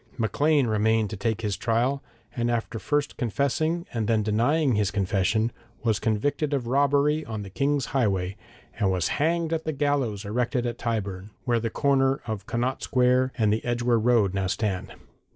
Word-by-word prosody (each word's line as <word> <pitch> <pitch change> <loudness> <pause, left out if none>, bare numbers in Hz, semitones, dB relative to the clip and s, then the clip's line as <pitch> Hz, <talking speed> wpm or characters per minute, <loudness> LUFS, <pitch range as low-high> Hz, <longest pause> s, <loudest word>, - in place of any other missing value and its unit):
Maclean 145 +5 +2
remained 110 -1 +1
to - - -3
take 110 +2 -2
his 105 -3 -1
trial, 120 +7 0 0.3
and 120 0 0
after 115 -1 -2
first 145 +4 -1
confessing 145 - 0
and 115 -3 -1
then 110 -2 +2
denying 125 +7 +2
his 105 -2 +1
confession, 100 +3 +1 0.3
was 110 -4 +1
convicted 140 +7 0
of 130 -4 -2
robbery 145 +4 +2
on 110 -2 -5
the 95 - -10
King's 140 +3 0
highway, 100 -7 0 0.4
and 100 -4 +2
was 95 -1 0
hanged 165 +1 +1
at 160 -1 -1
the 160 - -1
gallows 135 -8 0
erected 120 +3 -1
at 120 0 -3
Tyburn, 100 -4 -3 0.2
where 120 -2 +2
the 115 0 -2
corner 135 0 +2
of 105 -3 -5
Connaught 125 +3 -1
Square 125 +1 +2
and 110 -3 +3
the 110 - -2
Edgware 120 -1 +1
Road 110 -4 +3
now 95 -1 -1
stand. 95 -1 -2
120 Hz, 170 wpm, -26 LUFS, 105-140 Hz, 0.4 s, and